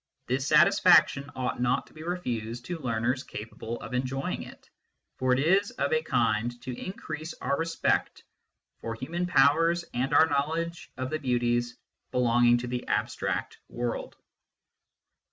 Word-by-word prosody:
This 130 +3 -1
satisfaction 165 -4 +5
ought 125 -1 -2
not 125 +1 +1
to - - -21
be 155 - -11
refused 120 -9 -4
to 175 -2 -4
learners 120 0 -1
capable 115 +1 -7
of - - -8
enjoying 130 +2 -2
it, - - -12 0.5
for 130 0 +1
it 125 - +4
is 190 +8 +3
of 140 +2 -1
a 155 - +3
kind 120 -4 0
to 125 -1 -5
increase 160 -1 -6
our 140 +2 -1
respect 165 +2 -1 0.6
for 115 -1 -4
human 170 +9 -3
powers 165 +2 +4
and 130 +3 -1
our 160 - +7
knowledge 160 +3 -2
of 130 0 -3
the 155 - -1
beauties 120 -2 0 0.3
belonging 120 -1 +4
to 120 +1 -4
the 125 0 -4
abstract - - -2
world. 120 -1 -4
130 Hz, 145 wpm, -28 LUFS, 120-160 Hz, 0.6 s, our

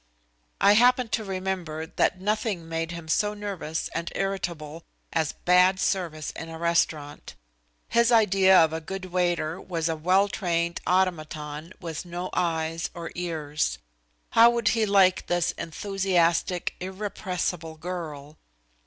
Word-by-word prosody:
I 200 - +6
happened 245 +1 +4
to 220 - 0
remember 185 -5 -3
that 180 +2 0
nothing 205 -3 -1
made 165 0 -2
him 170 -1 -7
so 210 +6 +1
nervous 195 -6 -4
and 170 +1 -3
irritable 170 -5 -3 0.3
as 160 -2 0
bad 180 +1 +4
service 165 -7 -1
in 165 - -8
a 165 - -7
restaurant. 160 -3 -1 0.5
His 235 +1 +3
idea 195 -4 +5
of 160 -2 +5
a 160 - -3
good 190 +3 -6
waiter 175 -2 0
was 165 -3 -2
a 165 - 0
well 185 +5 +3
trained 170 -4 -1
automaton 155 -3 -1
with 165 -4 -5
no 175 +1 -5
eyes 165 -1 -1
or 170 -1 -6
ears. 155 - -2 0.5
How 230 +1 +7
would 235 -2 +1
he 225 -2 +1
like 195 -2 +4
this 175 -1 +1
enthusiastic, 180 -1 0
irrepressible 185 -3 -4
girl? 155 -4 -7
175 Hz, 135 wpm, -26 LUFS, 160-190 Hz, 0.5 s, How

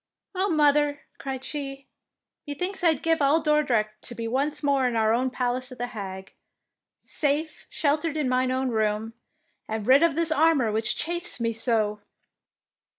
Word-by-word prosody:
" - - -65
Oh, 380 +2 +1
mother,'' 295 -2 +3 0.2
cried 265 -1 -5
she, 275 -2 -6 0.6
''methinks 360 +7 -4
I 330 -2 +5
'd 280 - -13
give 325 -1 +2
all 285 +3 +4
Dordrecht 255 -9 +1
to 240 - -5
be 230 0 -4
once 280 +6 -1
more 275 -3 +2
in 245 - -2
our 220 0 +3
own 255 +2 +1
palace 250 0 -2
in 255 - -9
The 245 - -2
Hague, 190 -3 -7 0.6
safe 300 +1 -2
sheltered 310 +1 0
in 295 -4 0
mine 255 0 +1
own 260 0 0
room, 220 0 -1 0.5
and 220 -1 -3
rid 265 +4 +6
of 335 -3 +3
this 335 0 0
armour 310 -7 +3
which 220 +1 +1
chafes 345 -3 -2
me 230 -1 0
so 220 -2 0
270 Hz, 170 wpm, -26 LUFS, 230-300 Hz, 0.6 s, rid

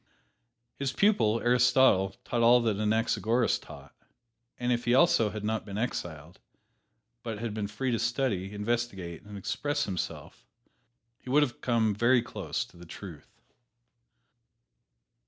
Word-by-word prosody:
His 140 -2 -1
pupil, 115 - +2
Aristotle, 120 -5 +4
taught 120 - -1
all 120 +1 +6
that 110 -4 0
Anaxagoras 115 +2 +1
taught, - - -13 0.6
and 125 0 -1
if 120 0 0
he 120 +1 +3
also 130 -7 +4
had 105 0 -6
not 110 +1 -1
been 100 -1 -7
exiled, 85 -8 -4 0.8
but 115 -3 -5
had 115 0 -4
been 105 -1 -3
free 125 +5 -3
to 115 - 0
study, 115 -5 -1
investigate 105 -5 -3
and 105 0 -10
express 145 +9 -2
himself, 95 -4 -5 0.8
he - - -11
would 145 +3 +5
have 125 -5 -4
come 115 -3 +1
very 120 +3 +3
close - - -4
to 85 - -20
the 85 - -12
truth. 85 -4 -11
115 Hz, 140 wpm, -29 LUFS, 100-125 Hz, 0.8 s, all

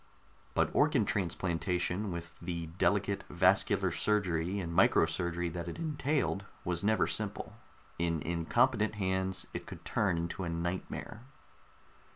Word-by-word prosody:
But - - +2
organ - - +4
transplantation, 90 +1 -1
with 85 -1 -6
the 85 -1 -3
delicate 100 -1 +2
vascular 90 +2 +3
surgery 95 -3 +1
and 85 -3 -4
micro 80 - +5
surgery 85 +1 -1
that 85 0 -5
it 85 - -5
entailed, 150 -9 0 0.2
was 85 -1 0
never 110 -2 +3
simple. - - -3 0.5
In 85 -1 +1
incompetent 105 +7 +2
hands, 95 -1 -1
it - - -5
could - - -9
turn 95 -5 +1
into 85 +3 -3
a 85 - -2
nightmare. 85 +6 -4
90 Hz, 130 wpm, -32 LUFS, 85-100 Hz, 0.5 s, micro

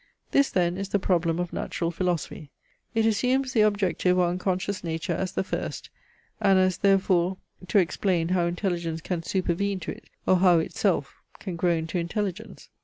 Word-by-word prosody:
This 280 -1 +4
then 175 -1 +1
is 195 0 -4
the 205 - +2
problem 170 -4 +1
of 175 -1 -3
natural 170 -1 -2
philosophy. 170 -4 -3 0.5
It 225 0 +3
assumes 255 +4 +1
the 220 - +4
objective 195 -3 +2
or 180 -1 +3
unconscious 185 +2 -2
nature 165 +1 -2
as 185 +2 -3
the - - 0
first, - - -5 0.5
and 195 -1 +5
as 185 -1 +2
therefore 190 -2 +2 0.3
to - - +2
explain 180 -2 +1
how 180 -2 +2
intelligence 170 -2 -2
can 175 +1 -3
supervene 190 +2 -1
to - - -4
it, - - -11 0.2
or 185 - +4
how 180 -1 +5
itself 160 - -1 0.2
can 185 -4 -5
grow 175 +1 +2
into 165 +2 -2
intelligence. 185 +2 -4
180 Hz, 170 wpm, -26 LUFS, 170-195 Hz, 0.5 s, and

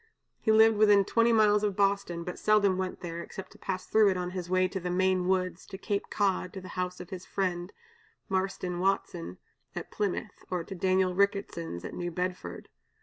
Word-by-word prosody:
He 220 - +2
lived 220 0 +6
within 205 -2 +6
twenty 230 +3 +3
miles 210 -2 +5
of 205 -2 0
Boston, 200 -4 +1
but 180 - -6
seldom 210 -3 +4
went 185 -1 -3
there, 170 -1 -5
except 190 +2 -9
to - - -17
pass 185 -1 -3
through 215 -2 +5
it 185 - 0
on 180 0 -3
his 180 -1 -5
way 185 0 +3
to 190 +1 -4
the 180 0 -4
Maine 185 0 +2
woods, 185 -1 0
to 190 - -8
Cape 200 +1 -2
Cod, 190 -3 0
to 190 - -6
the 185 - -10
house 180 0 -3
of 180 - -9
his 185 -1 -6
friend, 180 -2 -2 0.6
Marston 190 -2 -2
Watson 95 - -1 0.4
at - - -6
Plymouth, 205 0 -3
or 180 -2 -1
to 195 - -8
Daniel 185 0 +2
Ricketson's 195 - -1
at - - -6
New 175 0 -3
Bedford. 180 +1 -4
185 Hz, 200 wpm, -29 LUFS, 180-200 Hz, 0.6 s, lived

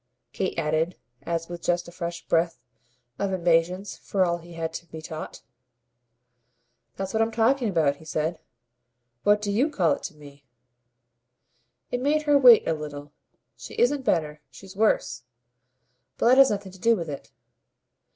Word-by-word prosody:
Kate - - -2
added 155 +3 0 0.3
as 165 -1 -2
with 175 -1 -7
just 175 0 0
a - - -10
fresh 170 -1 -6
breath 165 +1 +1 0.6
of 200 -1 -1
impatience 180 +2 +1
for 190 -2 0
all 170 0 -1
he 170 +1 -13
had 165 -1 -4
to 170 +1 -7
be 160 - -9
taught. 155 0 -8 1.5
"That's 195 0 -5
what 220 - +1
I'm 225 - +2
talking 235 +2 +2
about," 155 -6 +1
he 160 - -16
said. 155 +2 -2 0.8
"What 205 0 +3
do 205 - -1
you 250 +9 +2
call 180 - +1
it - - -1
to 190 -5 -7
me?" 145 -1 -15 1.5
It 245 - -1
made 300 +3 +1
her 295 -1 +3
wait 250 -5 +7
a 165 - +2
little. 145 -1 -7 0.4
"She - - -10
isn't 275 +3 +2
better. 155 - -1
She's 195 0 -13
worse. 195 - +1 1.0
But 235 - +3
that 260 +2 +6
has 270 - +8
nothing 200 -2 -3
to 190 - -15
do 230 +4 +4
with 170 -5 -5
it." 140 -2 -8
175 Hz, 165 wpm, -25 LUFS, 160-215 Hz, 1.5 s, has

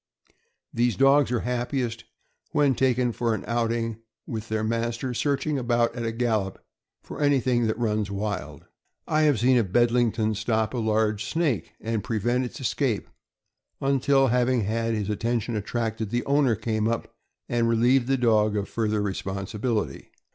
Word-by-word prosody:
These 120 -2 +1
dogs 135 +3 +4
are 120 - 0
happiest 120 -1 -2 0.5
when 145 -2 +3
taken 125 -1 +1
for 115 -1 0
an 100 - -6
outing 115 -1 -1 0.3
with 110 -1 -6
their 110 0 -1
master, 115 +3 -2
searching 140 +3 0
about 120 -1 +1
at 120 - -4
a 115 - -1
gallop 110 -5 -1 0.5
for - - -8
anything 130 -5 +2
that 110 - -1
runs 110 -3 0
wild. 100 -1 -4 0.4
I 155 - +2
have 135 -7 +1
seen 125 +2 +4
a - - +3
Bedlington 115 +1 +2
stop 110 +1 -1
a 125 - -1
large 110 -1 +1
snake 160 -7 -1
and 110 -2 -2
prevent 120 +2 0
its 125 - -8
escape 130 -3 -1 0.7
until, 135 0 +3
having 125 0 +2
had 115 +2 -1
his 105 -2 -2
attention 115 +2 -1
attracted, 110 0 -2
the 120 +2 -1
owner 140 -4 +3
came 110 0 -1
up 115 0 -3 0.3
and 120 -1 +1
relieved 120 +2 +3
the 135 0 +2
dog 110 -3 +3
of 100 -1 -2
further 110 -2 -1
responsibility. 100 - -3
115 Hz, 155 wpm, -25 LUFS, 110-125 Hz, 0.7 s, dogs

